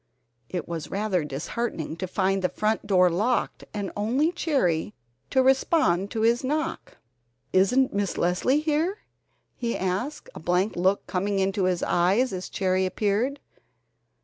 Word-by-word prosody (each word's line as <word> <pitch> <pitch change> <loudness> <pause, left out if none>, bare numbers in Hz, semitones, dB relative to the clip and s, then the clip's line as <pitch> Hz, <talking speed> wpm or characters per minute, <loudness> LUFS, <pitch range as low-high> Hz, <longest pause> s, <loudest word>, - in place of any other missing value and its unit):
It 180 -2 -4
was 165 -3 -5
rather 195 -4 0
disheartening 155 - -4
to 185 - -3
find 195 +1 0
the 180 - +1
front 215 0 -1
door 185 -3 +5
locked 220 +8 0
and 205 -2 -4
only 250 +10 +1
Cherry 210 - 0 0.3
to 260 - +3
respond 260 - +3
to 225 -1 -3
his 235 +3 +3
knock. 300 +3 -3 0.6
"Isn't 250 +8 +3
Miss 200 -2 -1
Leslie 190 - +2
here?" 315 +6 0 0.6
he 235 -1 -2
asked, 190 +11 -3
a - - -8
blank 180 +5 0
look 190 +3 +1
coming 195 +2 -1
into 195 0 +1
his 180 -2 0
eyes 195 +9 +2
as 185 0 -5
Cherry 185 -1 +1
appeared. 215 +9 0
200 Hz, 145 wpm, -26 LUFS, 185-250 Hz, 0.6 s, door